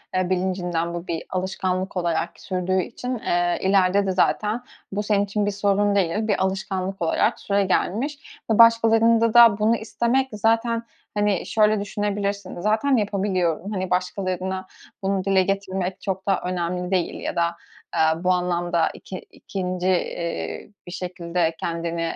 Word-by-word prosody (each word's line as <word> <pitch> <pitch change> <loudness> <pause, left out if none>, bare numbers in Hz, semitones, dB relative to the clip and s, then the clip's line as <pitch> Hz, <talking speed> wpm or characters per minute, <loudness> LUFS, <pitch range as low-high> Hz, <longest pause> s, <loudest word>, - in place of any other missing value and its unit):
eee, 185 -1 +1
bilincinden 180 -2 -1
bu 175 +1 -6
bir 165 -1 -3
alışkanlık 185 0 -2
olarak 170 -1 0
sürdüğü 185 0 -1
için, 245 +6 -6
ııı, 175 -8 0
ileride 195 +1 +3
de 190 - 0
zaten 210 +5 +1 0.3
bu 205 +1 -2
senin 205 -1 +2
için 205 +1 -1
bir 205 - 0
sorun 200 0 +1
değil, 200 +3 +1
bir 205 -3 +1
alışkanlık 190 0 -2
olarak 165 - +1
süregelmiş 200 +8 -1
ve 220 - +3
başkalarında 230 0 +5
da 235 -4 +7
bunu 220 +2 +3
istemek, 235 +4 0
zaten, 230 +2 +1 0.3
hani, 205 -3 +1
şöyle 215 -1 +3
düşünebilirsin, 200 -2 -3
zaten 220 +7 +2
yapabiliyorum, 195 -3 0
hani, 185 -3 -2
başkalarına 185 0 -2 0.4
bunu 195 -1 0
dile 190 -1 +3
getirmek 190 -1 -2
çok 190 0 -4
da 195 -2 +2
önemli 180 0 -2
değil 185 -3 0
ya - - -4
da, 170 0 +1 0.4
aaa, 160 +1 +2
bu 185 - +3
anlamda 175 -2 +1
iki 185 - -8
ikinci, 185 -1 -4
iii, 175 +2 -2
bir - - -7
şekilde 175 -2 -2
kendini 170 0 -3
190 Hz, 145 wpm, -23 LUFS, 180-210 Hz, 0.4 s, da